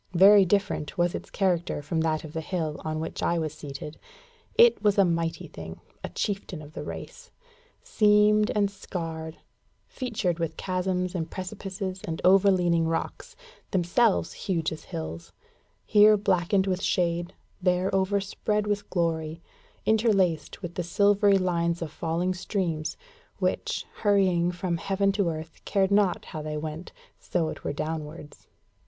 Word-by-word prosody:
Very 195 Hz, +2 st, +8 dB
different 195 Hz, -5 st, 0 dB
was 175 Hz, 0 st, +2 dB
its -, -, -6 dB
character 175 Hz, -6 st, 0 dB
from 160 Hz, +2 st, -1 dB
that 155 Hz, -1 st, 0 dB
of 155 Hz, -1 st, -9 dB
the 160 Hz, -, -2 dB
hill 160 Hz, -3 st, -3 dB
on 155 Hz, 0 st, -2 dB
which 160 Hz, -, -5 dB
I 170 Hz, -, +1 dB
was 155 Hz, -2 st, -2 dB
seated. 150 Hz, 0 st, -8 dB, 0.6 s
It 470 Hz, 0 st, +6 dB
was 205 Hz, -2 st, +3 dB
a 195 Hz, -, +6 dB
mighty 165 Hz, -1 st, -1 dB
thing, -, -, -9 dB, 0.2 s
a -, -, -4 dB
chieftain 195 Hz, -5 st, -3 dB
of 150 Hz, 0 st, -12 dB
the -, -, -6 dB
race, 485 Hz, 0 st, -8 dB, 0.5 s
seamed 210 Hz, 0 st, +4 dB
and 200 Hz, -1 st, +2 dB
scarred, 165 Hz, -4 st, -6 dB, 0.5 s
featured 215 Hz, -9 st, -2 dB
with 165 Hz, -2 st, -2 dB
chasms 185 Hz, -1 st, -1 dB
and 165 Hz, -3 st, -3 dB
precipices 190 Hz, 0 st, -5 dB
and 160 Hz, -1 st, -4 dB
over 195 Hz, +2 st, +6 dB
leaning 175 Hz, -3 st, +2 dB
rocks, 165 Hz, -, -3 dB, 0.3 s
themselves 190 Hz, +4 st, +2 dB
huge 165 Hz, -5 st, -2 dB
as 155 Hz, -1 st, -8 dB
hills; 80 Hz, +1 st, -6 dB, 0.5 s
here 210 Hz, 0 st, +6 dB
blackened 190 Hz, -1 st, +2 dB
with 185 Hz, -1 st, -1 dB
shade, 175 Hz, 0 st, 0 dB, 0.3 s
there 180 Hz, +1 st, +1 dB
overspread 200 Hz, +2 st, 0 dB
with 205 Hz, 0 st, -2 dB
glory; 165 Hz, -2 st, -1 dB, 0.5 s
interlaced 200 Hz, -7 st, +1 dB
with 175 Hz, -1 st, -5 dB
the 180 Hz, -, -2 dB
silvery 200 Hz, +3 st, +4 dB
lines 170 Hz, -2 st, 0 dB
of 165 Hz, -3 st, -5 dB
falling 170 Hz, +3 st, -1 dB
streams, 180 Hz, -5 st, -2 dB, 0.4 s
which, -, -, -1 dB
hurrying 185 Hz, -4 st, +3 dB
from 175 Hz, -1 st, -2 dB
heaven 195 Hz, +3 st, +1 dB
to 195 Hz, -3 st, +1 dB
earth, 160 Hz, 0 st, -7 dB
cared 195 Hz, -1 st, +1 dB
not 200 Hz, -3 st, +2 dB
how 155 Hz, -, -6 dB
they 150 Hz, 0 st, -4 dB
went, 155 Hz, +3 st, -6 dB, 0.3 s
so 165 Hz, -3 st, -1 dB
it -, -, -8 dB
were -, -, -1 dB
downwards. 155 Hz, 0 st, -6 dB
180 Hz, 150 wpm, -27 LUFS, 165-200 Hz, 0.6 s, Very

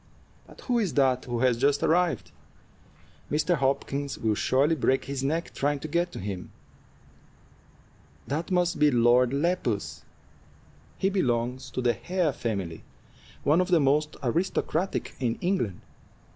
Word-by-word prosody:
But -, -, -15 dB
who 245 Hz, -2 st, 0 dB
is 200 Hz, -7 st, -1 dB
that 130 Hz, -3 st, +2 dB
who 120 Hz, -1 st, -3 dB
has 125 Hz, -3 st, +3 dB
just 140 Hz, +2 st, +2 dB
arrived? 175 Hz, +1 st, +1 dB, 1.0 s
Mr. 155 Hz, +4 st, +1 dB
Hopkins 140 Hz, -1 st, -1 dB
will 110 Hz, -1 st, 0 dB
surely 135 Hz, +8 st, +2 dB
break 135 Hz, -3 st, +1 dB
his 135 Hz, -1 st, -4 dB
neck 160 Hz, +5 st, -1 dB
trying 145 Hz, +1 st, 0 dB
to -, -, -4 dB
get 170 Hz, +3 st, 0 dB
to -, -, -6 dB
him." 95 Hz, -2 st, -5 dB, 1.8 s
"That 155 Hz, +5 st, -3 dB
must 180 Hz, -3 st, +1 dB
be 150 Hz, 0 st, +5 dB
Lord 120 Hz, 0 st, +4 dB
Lepus; 140 Hz, -, -1 dB, 1.0 s
he 195 Hz, -, +1 dB
belongs 125 Hz, -6 st, -1 dB
to 130 Hz, +1 st, -4 dB
the 120 Hz, -1 st, +3 dB
Hare 175 Hz, -, -1 dB
family, 100 Hz, -, -4 dB, 0.6 s
one 155 Hz, +5 st, +4 dB
of 180 Hz, -, -1 dB
the 175 Hz, -3 st, +4 dB
most 150 Hz, +2 st, +1 dB
aristocratic 170 Hz, +5 st, -1 dB
in 120 Hz, -3 st, 0 dB
England. 145 Hz, -, -1 dB
140 Hz, 140 wpm, -27 LUFS, 125-170 Hz, 1.8 s, be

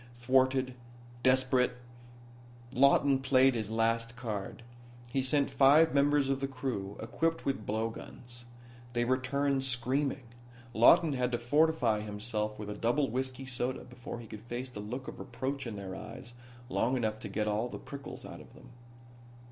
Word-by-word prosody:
Thwarted, 130 Hz, +1 st, +2 dB, 0.5 s
desperate, 130 Hz, 0 st, +3 dB, 1.0 s
Lawton 140 Hz, 0 st, +5 dB
played 130 Hz, 0 st, +4 dB
his 110 Hz, -3 st, -3 dB
last 115 Hz, +1 st, 0 dB
card. 115 Hz, -2 st, -5 dB, 0.5 s
He 135 Hz, -, +1 dB
sent 140 Hz, +2 st, +1 dB
five 150 Hz, +4 st, +6 dB
members 145 Hz, 0 st, +3 dB
of 135 Hz, 0 st, 0 dB
the 135 Hz, -, -1 dB
crew, 125 Hz, -7 st, -4 dB
equipped 165 Hz, +9 st, -1 dB
with 135 Hz, -6 st, -2 dB
blow 110 Hz, +2 st, 0 dB
guns. 120 Hz, +1 st, -8 dB, 0.5 s
They 120 Hz, 0 st, +1 dB
returned 135 Hz, +2 st, +1 dB
screaming. 130 Hz, +2 st, 0 dB, 0.5 s
Lawton 150 Hz, +8 st, +6 dB
had 125 Hz, -1 st, 0 dB
to -, -, +2 dB
fortify 125 Hz, -2 st, +2 dB
himself 105 Hz, 0 st, -3 dB
with 105 Hz, -1 st, -6 dB
a -, -, -5 dB
double 120 Hz, +4 st, +1 dB
whiskey 130 Hz, +1 st, -3 dB
soda 130 Hz, 0 st, -2 dB
before 125 Hz, -1 st, -8 dB
he 120 Hz, -, -9 dB
could 105 Hz, -1 st, -9 dB
face 120 Hz, +2 st, -5 dB
the 105 Hz, -, -8 dB
look 125 Hz, +6 st, -5 dB
of -, -, -8 dB
reproach 135 Hz, 0 st, -4 dB
in 110 Hz, -, -5 dB
their 95 Hz, -2 st, -6 dB
eyes 120 Hz, +5 st, -9 dB, 0.3 s
long 130 Hz, +1 st, +1 dB
enough 110 Hz, -2 st, -1 dB
to 105 Hz, -, -7 dB
get 105 Hz, +2 st, -1 dB
all 105 Hz, +3 st, 0 dB
of -, -, -11 dB
the -, -, -5 dB
prickles 140 Hz, -1 st, -8 dB
out -, -, -9 dB
of -, -, -16 dB
them. -, -, -15 dB
125 Hz, 165 wpm, -31 LUFS, 115-135 Hz, 1.0 s, five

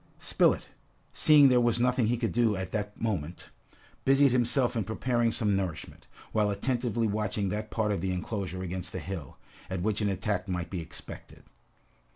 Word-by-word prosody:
Spilett, -, -, +2 dB, 0.5 s
seeing 150 Hz, -2 st, +6 dB
there 125 Hz, -1 st, +4 dB
was 120 Hz, -1 st, +2 dB
nothing 125 Hz, -1 st, +2 dB
he 120 Hz, +2 st, +1 dB
could 115 Hz, -1 st, -1 dB
do 115 Hz, -3 st, +2 dB
at 95 Hz, -1 st, -4 dB
that 105 Hz, -1 st, -4 dB
moment, 90 Hz, -7 st, -3 dB, 0.5 s
busied 135 Hz, 0 st, +5 dB
himself 125 Hz, +1 st, +2 dB
in 110 Hz, -, 0 dB
preparing 120 Hz, +3 st, 0 dB
some 105 Hz, -4 st, +1 dB
nourishment, 95 Hz, -5 st, -4 dB, 0.2 s
while 105 Hz, -2 st, +2 dB
attentively 120 Hz, +2 st, -1 dB
watching 105 Hz, -2 st, -1 dB
that 105 Hz, +2 st, -3 dB
part 110 Hz, -2 st, 0 dB
of 100 Hz, -5 st, -1 dB
the 95 Hz, 0 st, -1 dB
enclosure 95 Hz, -1 st, -4 dB
against 90 Hz, -1 st, -5 dB
the -, -, -3 dB
hill, 85 Hz, -8 st, -7 dB, 0.3 s
at 95 Hz, -2 st, -3 dB
which 110 Hz, +1 st, 0 dB
an 105 Hz, -, +1 dB
attack 95 Hz, 0 st, -2 dB
might 90 Hz, -2 st, -3 dB
be 90 Hz, -3 st, -3 dB
expected. 80 Hz, -, -10 dB
105 Hz, 175 wpm, -29 LUFS, 95-120 Hz, 0.5 s, seeing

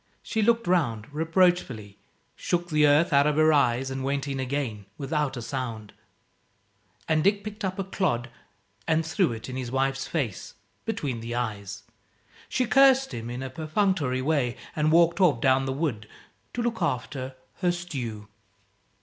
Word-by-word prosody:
She 220 Hz, -, -1 dB
looked 230 Hz, +2 st, +3 dB
round, 145 Hz, -12 st, +1 dB
reproachfully, 160 Hz, -, +1 dB, 0.4 s
shook 175 Hz, 0 st, -1 dB
the 150 Hz, -1 st, +5 dB
earth 155 Hz, +4 st, +4 dB
out 140 Hz, +1 st, +5 dB
of 150 Hz, -, +1 dB
her 155 Hz, +1 st, +5 dB
eyes 135 Hz, -2 st, +2 dB
and 135 Hz, 0 st, -3 dB
went 140 Hz, +1 st, -1 dB
in 135 Hz, -1 st, -3 dB
again 125 Hz, -6 st, -3 dB
without 145 Hz, -2 st, -1 dB
a 120 Hz, -, -5 dB
sound. 115 Hz, -4 st, -5 dB, 1.1 s
And 155 Hz, -1 st, +2 dB
Dick 200 Hz, +2 st, +2 dB
picked 215 Hz, 0 st, -7 dB
up 185 Hz, -1 st, -2 dB
a 195 Hz, -, -1 dB
clod 130 Hz, -11 st, -1 dB, 0.6 s
and 160 Hz, 0 st, +2 dB
threw 175 Hz, -, +1 dB
it 115 Hz, -1 st, -6 dB
in 130 Hz, 0 st, -5 dB
his 125 Hz, -2 st, -4 dB
wife's 135 Hz, +1 st, 0 dB
face, 125 Hz, -, -3 dB, 0.3 s
between 145 Hz, -, -2 dB
the 115 Hz, +1 st, -5 dB
eyes. 100 Hz, -4 st, -4 dB, 0.7 s
She 255 Hz, -, +1 dB
cursed 270 Hz, +1 st, +5 dB
him, 115 Hz, 0 st, -5 dB
in 125 Hz, +2 st, -5 dB
a 130 Hz, -, -5 dB
perfunctory 155 Hz, -4 st, 0 dB
way, 135 Hz, -5 st, 0 dB, 0.2 s
and 155 Hz, 0 st, +2 dB
walked 170 Hz, +3 st, +4 dB
off, 155 Hz, -10 st, +4 dB
down 135 Hz, +1 st, +3 dB
the 135 Hz, -, -1 dB
wood, 130 Hz, -7 st, -2 dB, 0.5 s
to 240 Hz, -, -1 dB
look 235 Hz, -3 st, -2 dB
after 130 Hz, -3 st, -2 dB, 0.2 s
her 180 Hz, -2 st, +2 dB
stew. 125 Hz, -12 st, -5 dB
140 Hz, 165 wpm, -26 LUFS, 125-175 Hz, 1.1 s, the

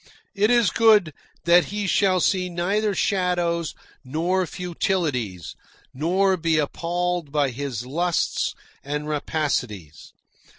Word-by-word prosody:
It 210 Hz, +2 st, +2 dB
is 240 Hz, -3 st, +4 dB
good 215 Hz, -8 st, +4 dB, 0.3 s
that 170 Hz, -1 st, +5 dB
he 205 Hz, +4 st, -4 dB
shall 190 Hz, -1 st, +2 dB
see 180 Hz, +1 st, +1 dB
neither 195 Hz, +4 st, 0 dB
shadows 175 Hz, -4 st, 0 dB, 0.3 s
nor 170 Hz, +7 st, 0 dB
futilities, 150 Hz, -, -2 dB, 0.4 s
nor 185 Hz, +7 st, +1 dB
be 165 Hz, -2 st, +1 dB
appalled 175 Hz, +1 st, -2 dB
by 145 Hz, -3 st, +1 dB
his 125 Hz, -2 st, -5 dB
lusts 170 Hz, +6 st, -1 dB, 0.3 s
and 150 Hz, +1 st, -4 dB
rapacities. 130 Hz, -, -3 dB
170 Hz, 110 wpm, -23 LUFS, 145-185 Hz, 0.4 s, that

